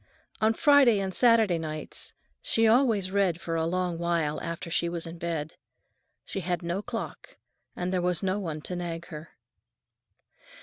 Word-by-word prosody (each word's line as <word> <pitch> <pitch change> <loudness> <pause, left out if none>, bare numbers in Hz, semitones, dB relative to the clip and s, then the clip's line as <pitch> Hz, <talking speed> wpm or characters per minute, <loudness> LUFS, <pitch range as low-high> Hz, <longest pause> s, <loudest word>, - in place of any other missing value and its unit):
On 220 +1 +3
Friday 280 -6 +6
and 190 -1 -2
Saturday 225 -7 +4
nights 155 -1 -4 0.3
she 225 - +1
always 220 -5 +3
read 190 -4 +2
for 165 -1 -3
a 165 0 0
long 180 -1 -1
while 170 -3 0
after 170 0 -5
she 170 +1 +1
was 170 -1 -4
in 165 0 -8
bed. 165 -2 -3 0.7
She - - -4
had 175 -1 -2
no 170 +3 -2
clock, 230 +1 -6 0.4
and 180 +1 -2
there 180 - +1
was 180 +1 0
no 190 +1 0
one 160 -6 -4
to 180 - -4
nag 170 -1 -4
her. 155 +1 -9
175 Hz, 165 wpm, -28 LUFS, 165-200 Hz, 0.7 s, Friday